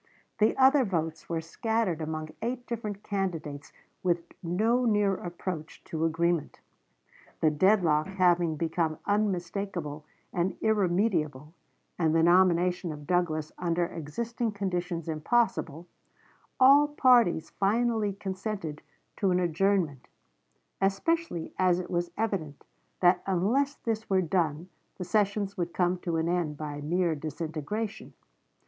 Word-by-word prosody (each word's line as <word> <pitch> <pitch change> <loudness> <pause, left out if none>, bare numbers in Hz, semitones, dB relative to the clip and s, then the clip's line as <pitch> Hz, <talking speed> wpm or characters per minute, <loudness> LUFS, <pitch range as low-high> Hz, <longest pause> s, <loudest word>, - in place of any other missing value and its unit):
The 215 +1 +3
other 270 +1 +6
votes 165 -6 -3
were 165 -1 -1
scattered 215 0 -1
among 155 0 -4
eight 245 +1 -3
different 215 -4 -5
candidates 165 -8 -3 0.3
with 175 -2 +1 0.2
no 215 +8 +1
near 210 -4 +3
approach 175 -3 -6
to 160 0 -2
agreement. 165 0 0 0.8
The 155 - +3
dead 190 +6 +4
lock 155 -1 +2
having 175 -4 +2
become 160 0 -1
unmistakable 185 -6 -2 0.3
and 175 +1 -1
irremediable, 175 -8 0 0.5
and 160 -2 +2
the 165 - +4
nomination 180 0 +3
of 150 -1 -8
Douglas 160 -3 0
under 175 0 +1
existing 220 +9 -4
conditions 180 -4 -3
impossible, 165 - 0 0.7
all 280 +3 +7
parties 245 - +3
finally 220 +1 +1
consented 190 -5 -5 0.4
to 195 - +1
an 180 0 +2
adjournment, 175 -5 0 0.7
especially 195 - 0
as 180 -2 +4
it 180 - -6
was 175 -1 0
evident 190 -10 -2 0.4
that 180 0 +5
unless 235 +10 +1
this 225 -1 -3
were 190 -1 +3
done 165 -1 0 0.3
the 185 - -4
sessions 200 +1 0
would 175 -1 -3
come 180 0 +1
to 170 -2 -2
an 160 +1 0
end 170 -4 -1
by 145 -1 -5
mere 170 +3 +1
disintegration. 160 +7 -5
180 Hz, 125 wpm, -28 LUFS, 160-205 Hz, 0.8 s, all